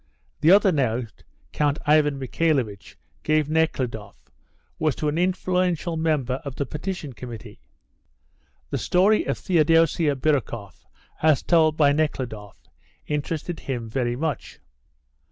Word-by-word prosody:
The 155 - +3
other 195 +1 +6
note 125 - -2 0.3
Count 145 0 0
Ivan 150 -1 +3
Michaelovitch 130 -6 -1 0.2
gave 155 -1 +1
Nekhludoff 130 -10 -2 0.5
was 155 -3 +1
to 150 - -2
an 155 +3 -1
influential 180 -2 0
member 150 -6 0
of 140 -2 -6
the 140 - -2
Petition 150 0 -5
Committee. 115 -3 -9 1.1
The - - -1
story 195 +4 +3
of - - -1
Theodosia 165 -3 +3
Birukoff 120 - -2 0.3
as 155 -3 +3
told 160 -2 +3
by 145 -2 +5
Nekhludoff 125 -9 -3 0.5
interested 155 +3 -3
him 120 -4 -4
very 120 +1 -1
much. 155 +2 -4
150 Hz, 120 wpm, -24 LUFS, 125-160 Hz, 1.1 s, other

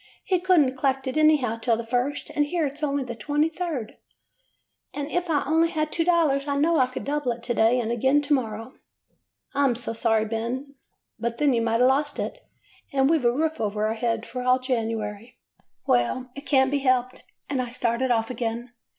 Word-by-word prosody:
'He 370 -3 +1
could 365 -2 +4
n't 260 -2 0
collect 270 0 0
it 260 - -3
anyhow 305 -7 +3
until 230 0 0
the 235 - -4
first, 250 +4 -2
and 295 -1 +1
here 335 0 0
it 280 0 -4
's - - -14
only 285 -2 0
the 240 -2 -6
23d. 295 0 -2 1.0
And 285 -1 -3
if 355 0 -1
I 295 -3 +2
only 325 +3 +3
had 310 -1 -2
two 330 - 0
dollars 315 -5 +2
I 285 - 0
know 325 +3 +3
I 255 -3 +4
could 255 - -6
double 290 -3 -1
it 235 0 -13
to 240 - -1
day 230 +2 +3
and 230 -1 -2
again 265 +5 +3
to 295 +1 +1
morrow.' 225 -2 -2 0.4
" - - -46
'I 285 - +1
'm 260 -4 +3
so 230 -1 -3
sorry, 225 -1 +1
Ben. 235 +5 -4 0.5
But 235 +1 -2
then 290 -3 +3
you 235 - +1
might 230 +1 +1
a' - - +6
lost 285 +3 +1
it, - - -4 0.5
and 270 +1 +3
we 325 - +4
've 250 - -5
a 240 - +5
roof 315 +5 -1
over 210 0 -1
our 215 - 0
heads 230 0 -2
for 250 - -5
all 255 0 +3
January.' 225 -3 -3 0.2
" - - -50
'Well, 245 - +1
it 280 +2 -9
can't 265 -2 +3
be 285 - +1
helped,' 255 -1 0 0.3
and 270 -3 -1
I 245 - -4
started 240 +1 0
off 225 -1 +1
again. 235 0 -4
255 Hz, 220 wpm, -25 LUFS, 235-290 Hz, 1.0 s, a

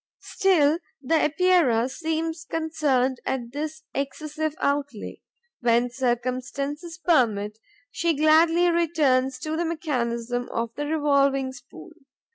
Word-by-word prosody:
Still, 330 -5 +2 0.2
the 310 +4 +2
Epeira 310 -8 +3
seems 320 +3 -3
concerned 300 -6 0
at 240 -3 -3
this 310 +3 -5
excessive 305 +3 -3
outlay. 280 -5 -2 0.4
When 240 0 +2
circumstances 255 +6 -3
permit, 220 - +1 0.3
she 335 -1 0
gladly 325 +3 +4
returns 290 -6 +2
to 310 0 -3
the 335 - 0
mechanism 245 -7 -2
of 230 0 -2
the 290 0 -3
revolving 280 -3 +2
spool. 260 +7 -13
290 Hz, 105 wpm, -25 LUFS, 255-320 Hz, 0.4 s, gladly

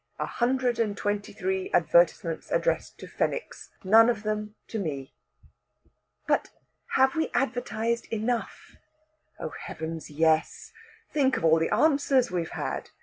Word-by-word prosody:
A - - -2
hundred 250 -1 0
and 210 -3 0
twenty 205 0 -2
three 190 -2 -2
advertisements 170 0 +2
addressed - - 0
to - - -10
Fenwicks 485 - -3
none 225 +4 +6
of 215 -3 -1
them 210 0 -3
to 225 - -3
me!" 140 -7 -4 1.1
"But - - +1 0.5
have 265 0 +4
we 320 -1 0
advertised 235 -3 -1
enough?" 230 +2 -3 0.6
"Oh, - - -4
heavens, 160 0 -7
yes. 160 +1 +1 0.4
Think 270 -3 +2
of - - -5 0.2
the 165 - 0
answers 280 - +3
we've 170 -3 -2
had! - - -4
215 Hz, 130 wpm, -27 LUFS, 170-250 Hz, 1.1 s, none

